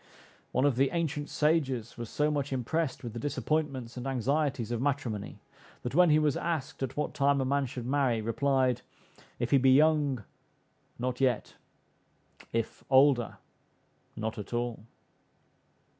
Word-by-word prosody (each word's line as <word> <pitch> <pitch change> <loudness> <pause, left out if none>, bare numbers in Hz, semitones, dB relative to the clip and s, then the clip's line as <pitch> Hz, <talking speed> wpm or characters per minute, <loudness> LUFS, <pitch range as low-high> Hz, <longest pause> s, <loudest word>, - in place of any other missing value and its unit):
One 130 - +2
of 140 -4 +2
the 135 +1 +3
ancient 150 -3 -1
sages 140 -7 0
was 120 -2 -6
so 150 +1 +1
much 145 -2 -2
impressed 135 +4 -1
with 120 -3 -6
the 120 - -5
disappointments 140 -3 -2
and 125 +2 -4
anxieties 135 -1 0
of 120 -1 -1
matrimony, 130 -7 -2 0.5
that 125 - -3
when 175 +2 +6
he 150 - +5
was 150 -3 +2
asked, 160 -7 -3
at 135 0 -3
what 150 - -1
time, 140 0 +2
a 135 - 0
man 140 0 +1
should 125 -1 -6
marry? 130 -3 +1
replied, 130 +2 +1 0.6
"If 120 0 -2
he 140 - +6
be 130 +1 +4
young, 145 -4 +3 0.7
not 125 +1 -3
yet; 125 -4 +1 1.0
if 115 -1 -3
older, 130 -3 +4 0.8
not 110 0 -4
at 105 - -7
all." 120 -2 -3
135 Hz, 150 wpm, -30 LUFS, 120-145 Hz, 1.0 s, when